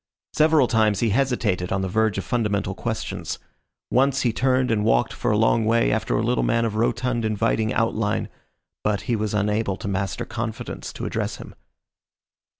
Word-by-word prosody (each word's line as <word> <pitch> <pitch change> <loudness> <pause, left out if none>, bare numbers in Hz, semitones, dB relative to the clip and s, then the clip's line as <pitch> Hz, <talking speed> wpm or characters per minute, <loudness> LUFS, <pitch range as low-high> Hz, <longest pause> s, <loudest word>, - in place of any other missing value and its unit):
Several 155 -4 +4
times 110 -4 +2
he 115 -3 +2
hesitated 110 -7 0
on 95 0 0
the - - -1
verge 110 +2 +1
of 95 - -3
fundamental 105 -5 -1
questions. 110 +2 -4 0.5
Once 135 +1 +3
he 120 -3 +1
turned 130 0 +2
and 105 -2 +1
walked 110 +1 +2
for - - -2
a 105 - +2
long 115 +1 +3
way 115 +2 +2
after 110 0 0
a 105 - 0
little 120 +2 +1
man 115 0 +2
of 110 - -2
rotund 120 +2 0
inviting 110 0 0
outline, 110 -3 0 0.6
but 105 -3 0
he 115 +6 -1
was 105 -1 -2
unable 105 -1 0
to - - -6
master 95 0 -2
confidence 110 -2 -5
to - - -5
address - - -2
him. - - -11
110 Hz, 175 wpm, -23 LUFS, 105-120 Hz, 0.6 s, Several